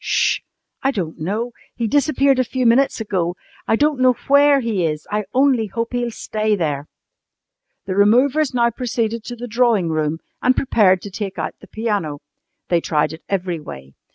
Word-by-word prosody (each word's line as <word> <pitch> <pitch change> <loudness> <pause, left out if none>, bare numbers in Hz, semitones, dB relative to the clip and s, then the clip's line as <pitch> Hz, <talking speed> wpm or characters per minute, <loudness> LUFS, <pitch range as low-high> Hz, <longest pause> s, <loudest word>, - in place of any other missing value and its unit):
"'Sh! - - +2 0.4
I 270 - +2
don't 185 -11 -3
know. 210 +9 -2 0.2
He 235 - -2
disappeared 275 +1 +2
a - - +4
few 255 +1 -2
minutes 240 +4 +3
ago. 180 -5 -1 0.3
I - - +3
don't 295 +2 +1
know 255 0 +5 0.2
where 285 0 +6
he 225 -7 -1
is. 155 -2 -2
I 210 0 -1
only 260 -4 +3
hope 230 +5 -4
he'll 245 -1 -1
stay 215 -1 -1
there!" 150 -5 -2 1.0
The 190 - -2
removers 255 +9 +3
now 235 -1 +2
proceeded 230 -2 -2
to 245 - -6
the 240 +1 -7
drawing 230 -6 +2
room 155 0 -1 0.2
and 255 0 +3
prepared 195 -8 +3
to 205 - -7
take 195 0 -5
out - - -3
the - - -13
piano. 205 -10 -2 0.5
They 170 -1 +2
tried 150 -1 0
it 160 - -10
every 180 -3 -1
way. 65 - -10
220 Hz, 180 wpm, -20 LUFS, 180-250 Hz, 1.0 s, where